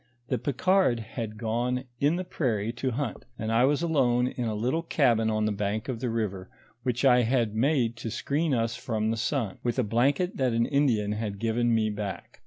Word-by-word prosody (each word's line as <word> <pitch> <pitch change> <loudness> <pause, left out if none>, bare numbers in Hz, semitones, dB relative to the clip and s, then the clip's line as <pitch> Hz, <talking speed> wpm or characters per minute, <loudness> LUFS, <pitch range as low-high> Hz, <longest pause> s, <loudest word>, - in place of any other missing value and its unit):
The 125 - 0
Picard 145 0 +2
had 110 -1 -6
gone 120 +3 -1 0.2
in 145 +4 +3
the 185 - -2
prairie 115 - -1
to 120 +2 -2
hunt, 130 -1 -3
and 110 0 -3
I 115 +3 +4
was 145 +4 +1
alone 125 -7 +2
in 125 -1 -3
a 110 -2 -1
little 125 +10 0
cabin 120 -9 +2
on 110 0 +1
the 110 - +1
bank 105 +1 -2
of 125 -4 -3
the 125 0 -2
river, 100 -5 -3 0.3
which 125 +2 -1
I 125 -2 +6
had 120 -2 +1
made 120 0 +1
to 115 - -5
screen 150 +8 -1
us 115 -2 0
from 110 -3 -1
the - - 0
sun, 115 -3 -1
with 120 0 -1
a 130 - +3
blanket 135 - +1
that 130 -3 +1
an 115 0 +2
Indian 120 -8 +1
had 105 -1 -3
given 115 +2 +1
me 110 -1 +1
back. 105 -1 -6
120 Hz, 205 wpm, -27 LUFS, 110-130 Hz, 0.3 s, I